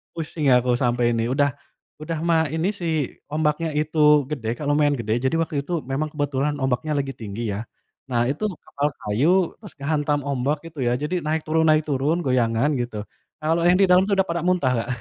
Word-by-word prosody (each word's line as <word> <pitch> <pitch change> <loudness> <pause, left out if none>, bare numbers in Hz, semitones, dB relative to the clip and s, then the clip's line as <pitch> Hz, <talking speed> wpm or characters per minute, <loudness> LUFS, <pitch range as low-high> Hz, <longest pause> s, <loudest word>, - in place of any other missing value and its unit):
pusing 155 -2 -3
aku, 125 0 +2
sampai 120 -2 +2
ini. 115 0 0
Udah 140 +1 +2 0.5
udah 155 +1 -3
mah 165 -1 +3
ini 160 +4 0
si 200 -4 -7 0.5
ombaknya 155 +1 0
itu 155 +1 -2 0.3
gede 115 -7 -2
kan 145 +4 -4
lumayan 145 0 +3
gede 115 -4 -1
jadi 130 - +1
waktu 145 -3 -2
itu 170 -1 -2
memang 145 +4 -3
kebetulan 145 -1 -1
ombaknya 130 +4 0
lagi 140 -2 -1
tinggi 115 -3 -5
ya, 105 +3 -4 0.4
nah 120 -3 0
itu 145 +10 -2 0.2
kapal 145 +1 -2
kayu 160 - +1
terus 210 -3 -12
ke 145 - -25
hantam 145 0 0
ombak 140 +1 -1
itu 165 -1 -12
ya 120 - +2
jadi 150 +6 -2
naik 155 +1 0
turun 160 +1 +1
naik 155 -1 +5
turun 145 +5 +1
goyangan 125 0 +2
gitu. 120 -3 -3 0.4
Kalau 165 +2 +1
yang 175 +1 +5
di - - +7
dalam 180 +1 +6
tuh 200 - 0
udah 190 0 +2
pada 170 0 -1
muntah, 180 -8 +2
Kak. - - -10
145 Hz, 200 wpm, -23 LUFS, 125-160 Hz, 0.5 s, di